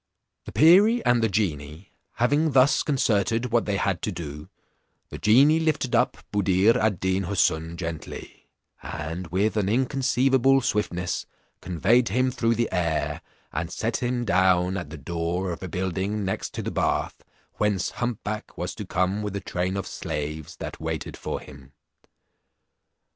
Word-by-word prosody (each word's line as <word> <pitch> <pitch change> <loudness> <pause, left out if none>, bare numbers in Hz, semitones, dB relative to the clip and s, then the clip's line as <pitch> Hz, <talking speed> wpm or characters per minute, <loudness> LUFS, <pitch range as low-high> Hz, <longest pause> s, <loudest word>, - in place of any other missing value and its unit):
The - - -7
perie 200 +9 +6
and 120 -1 +4
the 115 - +2
genie 85 -3 -3 0.2
having 145 +6 +2
thus 130 +1 +5
concerted 115 -4 +1
what 120 -1 +2
they 100 -1 0
had 95 -4 -1
to 105 - -2
do, 75 -4 -7 0.6
the - - -8
genie 140 +9 +5
lifted 155 -6 0
up - - +2 0.2
Buddir 100 +2 +3
ad 110 -6 +1
Deen 95 0 0
Houssun 85 -3 0
gently, 85 -2 -7 0.3
and 80 +4 -5
with 100 +6 0
an 100 -2 +1
inconceivable 130 +2 +3
swiftness 90 -6 -2 0.3
conveyed 105 +8 +2
him 130 +5 +1
through 115 -1 +1
the 120 +1 0
air 85 -4 -1 0.3
and 85 +2 -2
set 115 +4 -1
him 120 -1 -1
down 95 -2 +3
at 90 -6 -5
the 80 - -8
door 85 +4 -2
of 85 - -6
a 95 - -4
building 95 +3 -2
next 95 - -3
to - - -3
the - - -3
bath, - - -1 0.3
whence 105 -3 0
hump 120 -3 -3
back 105 0 -5
was - - -3
to - - -7
come 90 +3 0
with 105 -1 -4
a - - -1
train 95 0 -2
of 95 - -3
slaves 75 +1 -5
that - - -7
waited - - -4
for - - -4
him. 70 0 -14
100 Hz, 160 wpm, -25 LUFS, 90-120 Hz, 0.6 s, perie